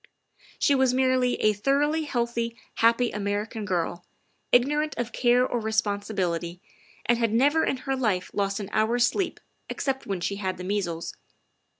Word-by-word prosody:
She 285 - +3
was 265 -2 +3
merely 255 -1 +2
a 215 - +5
thoroughly 290 +8 +1
healthy, 235 -3 -2 0.2
happy 230 +1 +3
American 210 +2 -3
girl, 175 -2 -2 0.5
ignorant 295 +5 +2
of 240 0 -2
care 245 0 +3
or 245 - -1
responsibility, 200 -6 -1 0.5
and 240 0 +2
had 230 -2 +1
never 285 +8 +3
in 270 - 0
her 270 -1 0
life 215 -8 -1
lost 200 0 -1
an 200 - -6
hour's 235 +3 +3
sleep 360 +7 -1 0.3
except 270 -1 -2
when 195 -3 -2
she 200 +3 -2
had 190 -2 -3
the 180 - -7
measles. 180 -4 -2
230 Hz, 155 wpm, -26 LUFS, 200-255 Hz, 0.5 s, a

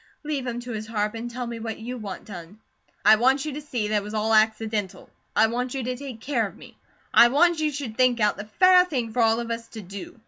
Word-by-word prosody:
Leave 290 -4 -3
him 240 0 -3
to 245 0 -7
his 215 -1 -5
harp, 210 -1 -1
and 230 +1 -5
tell 245 +1 -5
me 235 -1 -6
what 225 -1 -5
you 240 +3 -6
want 205 -6 -7
done." 180 0 -10 0.5
"I 215 +1 +8
want 265 +5 +2
you 305 - -4
to 295 - -6
see 245 -8 -3
that 215 - +2
it - - 0
was 210 +2 -7
all 220 +1 +1
accidental. 215 -2 0 0.2
I - - +5
want 245 +3 -2
you 265 - -2
to 250 +1 -2
take 255 -3 -8
care 240 -5 0
of - - -14
me. - - -14 0.4
I 240 - +8
want 325 +6 +3
you 305 -1 +1
should 270 -6 -6
think 255 -2 +3
out 210 -1 +2
the 205 - -7
FAIR 365 - +5
thing 250 -10 -3
for 245 - +1
all 225 0 +3
of 235 0 -4
us 230 0 -4
to 220 - -9
DO. 195 +4 -9
230 Hz, 265 wpm, -25 LUFS, 215-255 Hz, 0.5 s, I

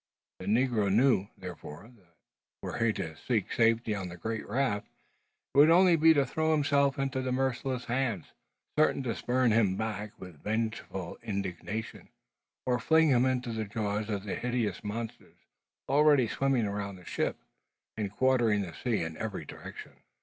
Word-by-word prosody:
The - - -8
negro 110 -3 +2
knew, 110 -2 +3
therefore, 90 +3 -9
that, 90 -6 -27 0.5
were - - -4
he 115 - +4
to 80 -5 -5
seek 110 +3 -1
safety 115 -1 +2
on 95 -3 -4
the 85 - -9
great 110 +4 -4
raft, 115 -3 0 0.7
it - - -3
would 150 +2 +8
only 175 +1 +6
be 160 0 +6
to 140 -2 +3
throw 160 +4 0
himself 140 -2 +2
into 135 -1 -1
merciless 130 -1 -1
hands, 120 -7 -2 0.5
certain 155 -3 +3
to 120 -3 -1
spurn 125 +4 +1
him 105 -4 +3
back 105 -1 -4
with 90 -6 -11
vengeful 110 -4 -3
indignation, 100 +2 -5 0.6
or 125 -1 +1
fling 160 +5 +4
him 130 -1 +4
into 125 -2 -1
the 110 -1 -2
jaws 105 0 -2
of 100 -2 -2
the 105 - -4
hideous 120 -6 -2
monsters 110 +2 -6 0.5
already 145 -3 +5
swimming 135 -1 +1
around 100 -1 -3
the 90 -1 -15
ship, - - -1 0.6
and 105 -3 -3
quartering 120 -3 +2
the 90 -4 -5
sea 115 -4 -1
in 80 0 -5
every 110 -3 -4
direction. - - -9
115 Hz, 160 wpm, -30 LUFS, 100-130 Hz, 0.7 s, would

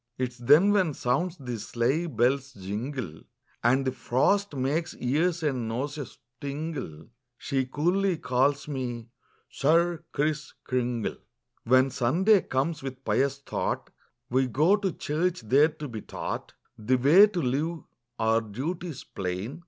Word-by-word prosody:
'Tis 125 -1 -3
then 150 +11 +6
when 185 -8 +2
sounds 170 +9 0
the 125 -5 -5
sleigh 130 +11 0
bell's 135 0 +1
jingle 105 - -5 0.4
And 130 +3 +3
the 130 - +1
frost 195 +10 +1
makes 145 +6 -1
ears 160 +7 0
and 130 -6 -1
noses 140 +5 -4 0.2
tingle, 140 - -5 0.3
She 135 -2 -1
coolly 175 +6 +1
calls 140 +2 +1
me 120 -5 -4 0.4
'Sir 170 +3 +2
Kriss 150 +1 -1
Kringle.'" 125 -3 -1 0.5
Copyrighted, - - -17
18U7 130 +2 +6
c^^aHEN 135 - -4
Sunday 175 - +3
comes, 140 +5 -1
with 130 -1 -7
pious 140 0 +1
thought - - -2 0.4
We 130 +1 +3
go 155 - +4
to 200 -3 -1
church, 165 +3 -1
there 135 +8 +4
to 150 -1 -8
be 110 -4 -6
taught - - -5 0.3
The 115 +4 +2
way 160 +11 +7
to 200 -4 -3
live, 150 +3 -1 0.3
our 115 0 +2
duties 145 - -5
plain. 95 - -5
135 Hz, 140 wpm, -27 LUFS, 125-160 Hz, 0.5 s, way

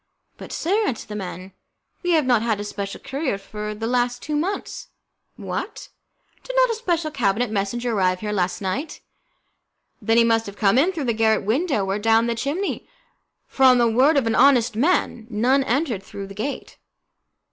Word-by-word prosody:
"But, - - -11
sir," 405 +6 0
answered 230 - -4
the 210 - -5
man, 185 -1 -7 0.5
"we 355 -1 +1
have 310 -4 +3
not 245 -4 +3
had 225 -3 0
a - - -3
special 200 -1 -5
courier 270 -6 -3
for 210 +2 -6
the 225 +2 -5
last 245 +1 0
two 300 - -3
months." 365 +7 -3 0.5
"What? - - -6 0.5
Did - - -6
not - - +4
a - - 0
special 340 -8 -1
cabinet 225 -2 0
messenger 225 +4 -2
arrive 185 -2 +1
here 210 -1 -3
last 185 -2 -1
night?" 275 - -3 1.0
"Then 225 0 +2
he 235 - +6
must 225 -1 +2
have 200 0 -9
come 205 +3 +3
in 340 +7 +3
through 330 -6 -4
the 235 - +1
garret 220 0 +2
window 250 - 0
or 195 +2 -1
down 225 +1 +3
the 235 - 0
chimney, 290 - -3 0.6
for, - - -8
on 255 -1 +7
the 240 -1 +4
word 260 +7 +4
of 270 - +2
an 225 - +1
honest 250 -3 +4
man, 240 -4 0
none 250 +5 +2
entered 260 - 0
through 195 0 -8
the 195 - -10
gate." 220 +8 -5
235 Hz, 190 wpm, -22 LUFS, 210-280 Hz, 1.0 s, on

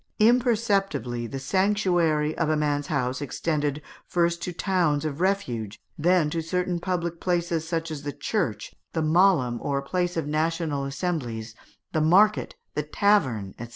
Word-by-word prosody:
Imperceptibly, 210 - +2
the 135 - -5
sanctuary 175 -2 +1
of 165 -2 0
a 155 - +2
man's 145 -1 0
house 130 -3 -1
extended, 145 +1 -2 0.2
first 170 -1 +1
to 180 - -3
towns 170 -5 +1
of 155 +1 -3
refuge, 125 - -1 0.2
and 150 - -9
then 175 -4 +4
to 165 0 -1
certain 180 +2 -1
public 170 -2 -2
places, 170 -2 0
such 165 -1 -2
as 150 -2 -5
the 145 0 -4
church, - - -2 0.2
the 160 - 0
mahlum, 155 -7 +3
or 140 -1 -1
place 175 +3 -1
of 160 - -1
national 155 -1 -1
assemblies, 135 -7 -3 0.4
the 155 - +1
market, 200 +7 +4 0.2
the 150 - 0
tavern, 145 - +1
&c. 120 - -6
160 Hz, 155 wpm, -26 LUFS, 145-180 Hz, 0.4 s, then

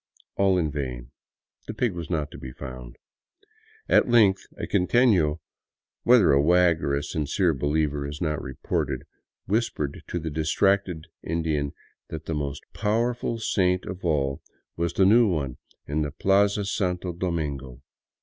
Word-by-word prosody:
All 95 -1 +3
in 80 -4 0
vain; 65 -4 -5 0.6
the 110 - -5
pig 115 -2 0
was 85 -2 -6
not 75 -4 -1
to - - -10
be 65 - -7
found. 65 -2 -9 0.9
At - - +4
length 105 -5 +4
a - - -3
quiteno 90 -7 +3 0.3
— - - -67
whether 120 -8 +6
a 70 0 +5
wag 85 +1 +4
or 70 0 +1
a 70 - -2
sincere 80 +2 0
believer 75 +1 0
is 75 +1 -7
not 75 -3 -1
reported 65 0 -3 0.2
— - - -67
whispered 95 - -1
to - - -3
the 80 -2 -4
distracted 85 +2 +1 0.2
Indian 80 -3 -1 0.4
that 80 -1 -7
the 80 - -3
most 70 -2 -3
powerful 115 +2 0
saint 90 -4 +1
of 95 0 -7
all 70 -5 0 0.3
was 85 0 -1
the 95 - +4
new 115 +4 +6
one 70 -9 -2 0.3
in 75 +2 -1
the 75 - -1
Plaza 100 +6 +2
Santo 90 -3 -1
Domingo. 75 -8 -4
80 Hz, 155 wpm, -25 LUFS, 70-95 Hz, 0.9 s, whether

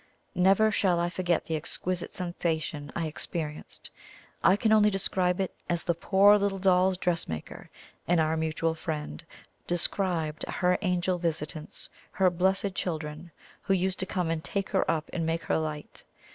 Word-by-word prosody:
Never 195 +4 +4
shall 185 -4 +2
I 175 0 0
forget 175 -1 0
the 160 - -2
exquisite 175 +3 -2
sensation 160 -4 -3
I 170 - -1
experienced! 155 0 -5 0.5
I 190 - +6
can 215 +1 +1
only 210 -1 +6
describe 185 -2 0
it 190 - -1 0.2
as 170 -1 0
the 170 - +1
poor 200 +4 +5
little 200 -1 0
Doll's 185 0 +3
Dressmaker 170 - -3 0.4
in 175 -1 +3
"Our 160 0 +2
Mutual 160 +1 0
Friend" 155 -1 -5 0.4
described 175 -3 0
her 180 0 +1
angel 180 -1 0
visitants, 155 -2 -4 0.3
her 185 -1 +3
"blessed 190 +2 +1
children," 155 -2 -4 0.3
who 195 - +1
used 190 +1 0
to 190 - -1
come 180 -4 -1
and 160 -1 -2
"take 200 -1 -2
her 195 - +1
up 160 -1 0
and 170 - -1
make 165 +1 -1
her - - +1
light." 155 -1 -5
175 Hz, 160 wpm, -28 LUFS, 160-190 Hz, 0.5 s, I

